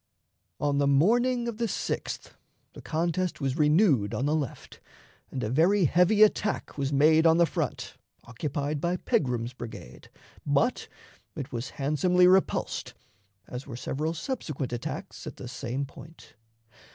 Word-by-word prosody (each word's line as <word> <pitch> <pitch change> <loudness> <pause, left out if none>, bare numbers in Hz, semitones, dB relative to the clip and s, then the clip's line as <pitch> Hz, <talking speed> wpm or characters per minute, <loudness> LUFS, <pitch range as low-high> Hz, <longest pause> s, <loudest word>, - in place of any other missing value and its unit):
On 145 -1 +1
the 140 - +3
morning 240 - +3
of 235 -2 -4
the 235 0 0
6th - - -4 0.4
the - - -11
contest 170 +2 -1
was 135 -2 -1
renewed 150 - +3
on 125 - -1
the 150 - +1
left, 145 -5 -5 0.5
and 130 - -4
a 110 - -1
very 175 +7 +4
heavy 180 +8 +5
attack 210 0 +1
was 140 -1 -2
made 155 +3 +5
on 165 0 +5
the 170 - +5
front, - - -4 0.3
occupied 145 +4 -3
by 175 +1 0
Pegram's 125 - -1
brigade, 110 - -10 0.3
but 145 - +1 0.5
it 145 -5 -6
was 120 +1 -4
handsomely 155 +6 +3
repulsed, 185 +1 +2 0.5
as 125 +2 -7
were 120 - -7
several 155 +6 -3
subsequent 155 - -4
attacks 120 - -6
at - - -7
the - - -8
same 125 +2 -4
point. 160 +4 -14
150 Hz, 145 wpm, -27 LUFS, 135-180 Hz, 0.5 s, heavy